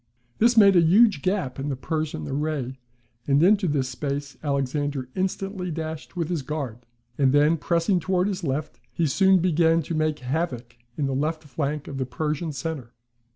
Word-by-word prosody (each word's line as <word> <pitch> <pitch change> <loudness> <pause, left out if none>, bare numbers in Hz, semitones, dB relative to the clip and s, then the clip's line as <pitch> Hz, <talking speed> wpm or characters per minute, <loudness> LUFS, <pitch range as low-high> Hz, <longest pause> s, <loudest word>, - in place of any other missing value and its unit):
This 235 +1 +4
made 200 -3 +7
a 175 - +7
huge 195 0 +5
gap 185 -9 -1
in 140 +2 -3
the 135 - -1
Persian 145 - -3
array, 140 -3 -3 0.5
and 140 +2 +4
into 195 +1 +4
this 140 -4 0
space 140 +2 -4
Alexander 140 -1 -1
instantly 190 0 -2
dashed 160 0 -5
with 170 -3 -1
his 170 -4 -1
guard; 135 -4 -4 0.4
and 135 -2 +4
then 145 +3 +4
pressing 170 +4 +1
towards 185 +1 +1
his 190 -1 -5
left, 150 +1 -3
he 165 +6 0
soon 190 +6 +4
began 165 -2 +3
to 165 - -5
make 155 -1 0
havoc 125 -3 -3 0.2
in 145 - 0
the 135 - -1
left 155 +4 -1
flank 145 +1 -3
of 135 - -6
the 130 - -2
Persian 155 +5 -2
centre. 135 -4 -5
155 Hz, 175 wpm, -25 LUFS, 140-170 Hz, 0.5 s, made